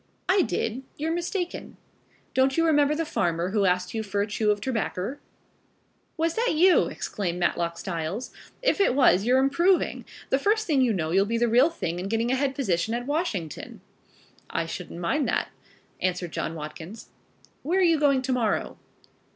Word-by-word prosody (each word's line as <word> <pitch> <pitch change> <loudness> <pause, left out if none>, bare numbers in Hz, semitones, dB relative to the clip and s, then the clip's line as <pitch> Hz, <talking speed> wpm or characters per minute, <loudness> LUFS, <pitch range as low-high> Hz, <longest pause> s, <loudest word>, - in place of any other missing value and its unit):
"I 375 +1 +4
did? 240 -6 -2 0.2
You're 320 +2 -1
mistaken." 350 +1 -4 0.6
"Don't 265 +2 +2
you 330 - +3
remember 295 -2 +3
the 330 +1 -1
farmer 175 - -1
who 205 -1 +2
asked 180 0 +1
you 225 - -1
for 200 -1 -1
a - - -1
chew 210 0 -1
of 205 0 +2
terbacker?" 235 0 -3 1.0
"Was 325 +1 +1
that 460 -4 0
you?" 360 +4 +5
exclaimed 180 -4 -3
Matlock 170 -1 0
Styles. 180 +6 -4 0.3
"If - - +2
it 325 - +3
was 230 -8 +4
you're 250 +2 +4
improving. 340 +8 +2 0.3
The 270 - +3
first 430 +7 +1
thing 295 -7 +2
you 250 -3 +3
know 160 -6 -1
you'll 195 +3 +3
be 230 +2 0
the 240 +1 +2
real 245 +7 +5
thing 175 - -4
and 190 +2 -4
getting 230 +2 0
a - - +3
head 270 0 0
position 220 -4 0
at 245 0 -4
Washington." 270 - -3 0.7
"I 165 - -1
shouldn't 165 +1 -7
mind 250 - 0
that," - - 0 0.5
answered 180 -2 -1
John 165 - -3
Watkins. 160 +7 -8 0.5
"Where 340 +6 0
are 380 - +4
you 330 -3 +4
going 275 -3 +3
to 260 0 0
morrow?" 235 -4 -1
240 Hz, 180 wpm, -26 LUFS, 185-300 Hz, 1.0 s, you